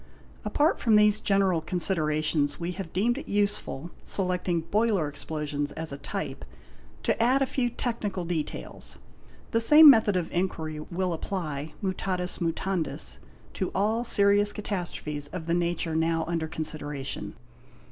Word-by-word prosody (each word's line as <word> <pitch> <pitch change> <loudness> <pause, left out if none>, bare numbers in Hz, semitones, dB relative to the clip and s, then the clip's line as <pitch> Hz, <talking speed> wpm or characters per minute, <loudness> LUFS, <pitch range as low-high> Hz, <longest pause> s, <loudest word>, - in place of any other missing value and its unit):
Apart 300 +3 +2
from 225 -3 +3
these 210 0 +5
general 195 -5 +2
considerations, 155 -4 +1
we 170 +1 -2
have 180 -3 -6
deemed 235 +8 +1
it - - -10
useful, 200 -6 -1
selecting 180 -3 0
boiler 205 -2 +1
explosions 145 0 -4
as 160 -1 -5
a 140 - -5
type, - - -5 0.6
to - - +1
add 260 +4 +4
a - - +2
few 255 -1 -1
technical 215 -6 -3
details; 165 -3 -5 0.5
the. 230 - +2
same 300 +5 +10
method 220 -5 +3
of 175 -3 -1
inquiry 160 -4 -2
will 175 +3 -2
apply, 155 -4 -4
mutatis 185 -1 -2
mutandis, 170 0 -2 0.3
to - - -2
all 215 +5 +1
serious 205 -2 +3
catas 200 -4 -4
trophes 145 -1 -5
of 175 -3 -5
the 170 - 0
nature 170 -1 0
now 165 0 +1
under 165 -1 -2
consideration. 150 -3 -3
180 Hz, 140 wpm, -27 LUFS, 160-205 Hz, 0.6 s, same